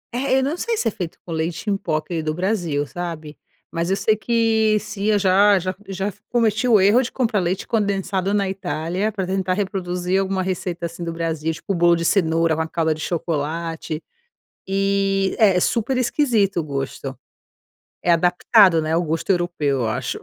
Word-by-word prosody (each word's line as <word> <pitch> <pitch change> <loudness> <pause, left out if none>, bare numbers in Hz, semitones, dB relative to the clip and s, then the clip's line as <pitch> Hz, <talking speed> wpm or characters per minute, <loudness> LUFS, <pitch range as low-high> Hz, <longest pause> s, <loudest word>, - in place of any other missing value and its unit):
É 265 +1 +1
eu 265 - +2
não 290 +5 -1
sei 460 +3 -1
se 240 - 0
é - - +1
feito 175 -4 -6
com 170 - -8
leite 165 +5 -2
em - - +2
pó 170 -5 -2
aquele 160 +1 -2
do 155 0 -2
Brasil, 175 -7 -1
sabe? 160 -2 -6 0.4
Mas 170 +1 -2
eu 195 - +2
sei 215 +2 +2
que 220 -1 +2
sim 200 0 -6
eu 215 -1 +3
já 200 +1 +4
já 185 +1 -2
já 195 0 -3
f - - -14
cometi 230 0 +1
o 220 -4 +6
erro 205 +6 +5
de 250 - -4
comprar 230 -5 0
leite 185 +1 -1
condensado 200 -3 0
na 200 -2 +1
Itália 190 +2 -2
pra 195 -2 -3
tentar 185 0 -1
reproduzir 185 -2 -1
alguma 190 -1 -1
receita, 180 -2 -3
assim, 170 +1 -6
do 165 - -3
Brasil 160 -1 -2
tipo 170 +5 -4
o - - -2
bolo 170 0 +4
de 170 0 -2
cenoura, 165 -3 +2
uma 160 +1 -1
calda 160 -1 0
de 155 - -9
chocolate 165 0 -3 0.6
e 195 0 +1
é 200 -4 +5
é - - +3
super 240 +5 0
esquisito 235 - +1
o - - -2
gosto 135 -1 -5 0.8
é 175 - +2
adaptado, 180 +1 +4
né, 155 +1 -2
ao 170 - +2
gosto 165 +3 -3
europeu 170 -6 0
eu 115 - 0
acho. 110 - -3
185 Hz, 195 wpm, -21 LUFS, 165-205 Hz, 0.8 s, o